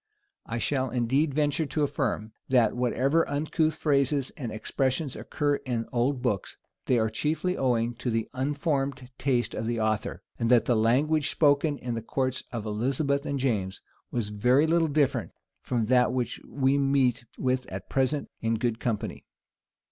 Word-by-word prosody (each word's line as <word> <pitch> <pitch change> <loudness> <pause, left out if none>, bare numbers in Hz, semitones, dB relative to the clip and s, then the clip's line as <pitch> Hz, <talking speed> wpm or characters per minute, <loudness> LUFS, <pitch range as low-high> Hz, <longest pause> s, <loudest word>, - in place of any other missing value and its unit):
I 115 - -3
shall 130 +1 0
indeed 130 +5 +1
venture 150 +2 +1
to 150 +1 0
affirm, 135 -6 -1 0.2
that, 120 -4 +4
whatever 130 +6 +2
uncouth 155 +2 0
phrases 140 -2 +1
and 120 -6 -5
expressions 130 +6 -1
occur 145 -1 -1
in 120 -4 -3
old 125 +2 +1
books, 105 -7 -1 0.3
they 125 - +3
were 110 -1 +1
chiefly 160 +9 -1
owing 120 -2 +1
to 125 +1 -3
the 115 -1 0
unformed 135 -1 -1
taste 125 -3 +1
of 110 - -3
the 115 -1 -1
author; 110 -1 -1 0.2
and 115 -1 +1
that 125 -2 +5
the 120 - +2
language 140 +8 +2
spoken 145 0 +3
in 125 -2 -4
the 115 - -3
courts 130 +3 -2
of 115 -3 -4
Elizabeth 135 +6 0
and 140 - -1
James, 105 -8 -1 0.3
was 115 -4 -2
very 125 +8 +3
little 165 0 +3
different 145 -2 +1 0.3
from 120 -3 -1
that 125 +2 +4
which 125 -2 -2
we 140 0 +1
meet 135 -4 +2
with 130 -1 0
at - - -7
present 135 +2 0
in 115 0 0
good 115 0 -1
company. 110 -4 -3
130 Hz, 165 wpm, -27 LUFS, 115-145 Hz, 0.3 s, that